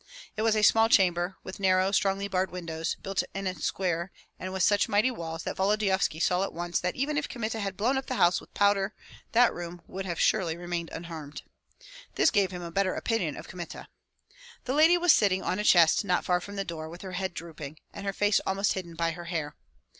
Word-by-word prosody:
It 215 - -2
was 220 -1 +3
a 215 - +1
small 225 +2 +5
chamber, 180 -2 +3
with 185 - -8
narrow, 190 0 +3
strongly 195 0 +1
barred 190 -1 0
windows, 165 -2 -4
built 195 0 0
in 195 0 -3
a 185 - 0
square 175 +1 -2 0.3
and 185 - -5
with 190 -1 -1
such 205 +2 +3
mighty 215 +5 +3
walls, 165 -7 -6
that - - -4
Volodyovski 195 -4 +1
saw 180 +1 +2
at 195 - -4
once 175 +1 -2
that 180 0 -2
even 290 +3 0
if 295 - -5
Kmita 225 -2 -3
had 195 -2 -3
blown 255 +6 +1
up 265 - -9
the 255 - -2
house 175 -5 +3
with - - -17
powder 200 0 +2 0.4
that 240 +1 +5
room 175 0 -7
would 190 0 -6
have 170 -2 -3
surely 170 -6 +2
remained 175 -1 -4
unharmed. 160 -3 -8 0.7
This - - +4
gave 200 -4 +2
him 180 -1 -7
a 170 - -6
better 190 +1 +1
opinion 195 - -1
of - - -9
Kmita. 175 -2 -8 0.8
The 260 - -1
lady 320 +4 +6
was 350 -2 +5
sitting 190 -2 +2
on 185 - -1
a - - -1
chest 170 -4 +5
not 180 -3 0
far 180 -1 +2
from 200 +3 -8
the 195 -1 -2
door, 160 -2 -6
with 170 +3 -10
her 190 - -6
head 185 -1 -3
drooping, 155 -3 -8 0.2
and 200 - -8
her 200 - -1
face 205 +1 +2
almost 195 +1 0
hidden 170 -3 -6
by 165 0 0
her 175 +1 -8
hair. 160 -4 -3
190 Hz, 220 wpm, -28 LUFS, 175-205 Hz, 0.8 s, lady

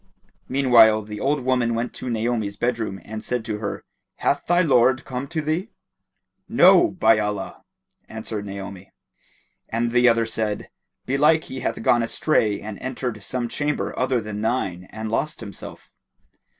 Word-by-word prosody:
Meanwhile 120 -5 +5
the 105 0 -7
old 140 +4 0
woman 125 -2 +1
went 115 +1 -2
to 125 - -6
Naomi's 110 -3 -1
bedroom 115 -5 -2
and 110 0 -6
said 125 -2 -2
to 105 -2 -3
her, 100 -2 -4 0.3
"Hath - - 0
thy 175 +1 +4
lord 130 -3 +3
come 130 +1 -4
to 160 0 -2
thee?" 160 +8 -1 0.8
"No, 350 - +6
by 110 -10 +3
Allah!" 105 -1 -3 0.5
answered 110 -1 -5
Naomi, 100 -1 -8 0.8
and 115 +1 -1
the 125 0 +5
other 115 0 +2
said, 110 -2 -3 0.3
"Belike 150 +4 +3
he 130 - -7
hath 115 -2 -3
gone 120 - +4
astray 115 -3 +1
and 105 -1 -7
entered 125 -4 -4
some 120 +4 -3
chamber 145 +4 -2
other 125 -1 +1
than 105 -1 -5
thine 95 -6 -1
and 110 0 -6
lost 150 +6 -1
himself." 100 - -9
115 Hz, 150 wpm, -23 LUFS, 110-130 Hz, 0.8 s, No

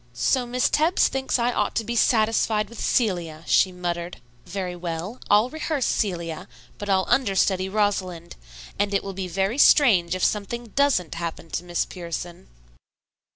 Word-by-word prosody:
"So 250 - +1
Miss 250 +1 +1
Tebbs 320 +5 +2
thinks 265 0 -1
I 240 0 +1
ought - - -1
to 225 - 0
be 235 +2 -4
satisfied 220 -2 +2
with 235 - -11
'Celia,'" 175 -9 0
she 185 - +3
muttered. 175 -1 -4 0.3
"Very 180 -1 -4
well, 175 +6 -5
I'll 215 +5 +4
rehearse 310 -3 -2
Celia, 175 -2 -2 0.3
but 205 - -6
I'll 190 -1 +2
understudy 195 -5 +1
Rosalind, 190 -5 -1 0.4
and 205 0 +1
it 195 - +1
will 195 - -6
be 190 0 -4
very 195 +8 -1
strange 190 - +5
if 185 - -3
something 230 +3 -1
doesn't 250 - +1
happen 165 -1 -6
to 175 - -3
Miss 175 -1 -1
Pierson." 175 -1 -7
195 Hz, 155 wpm, -24 LUFS, 175-235 Hz, 0.4 s, strange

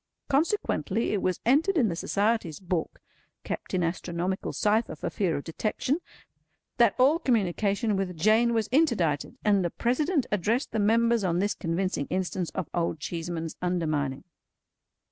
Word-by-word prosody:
Consequently 275 - 0
it 200 - 0
was 185 -1 0
entered 315 - +3
in 250 -7 +4
the 170 - -2
Society's 200 -3 0
book 180 -3 -3 0.4
(kept - - -4
in 180 - +1
astronomical 175 +2 -2
cypher 215 +2 +1
for - - -4
fear 185 -6 0
of 140 - -5
detection), 215 - -1 0.8
that 235 -4 +4
all 280 +6 +4
communication 210 - +1
with 190 -3 -2
Jane 220 +6 +3
was 220 -2 +1
interdicted: 235 - +1
and 200 -3 +4
the 175 - 0
President 285 - 0
addressed 210 +6 0
the 220 - -1
members 230 +2 +3
on 175 -2 +1
this 200 +3 +1
convincing 165 -3 -2
instance 185 -1 -2
of 180 - -2
Old 170 -2 -1
Cheeseman's 165 0 -4
undermining. 155 -6 -1
200 Hz, 145 wpm, -27 LUFS, 170-235 Hz, 0.8 s, in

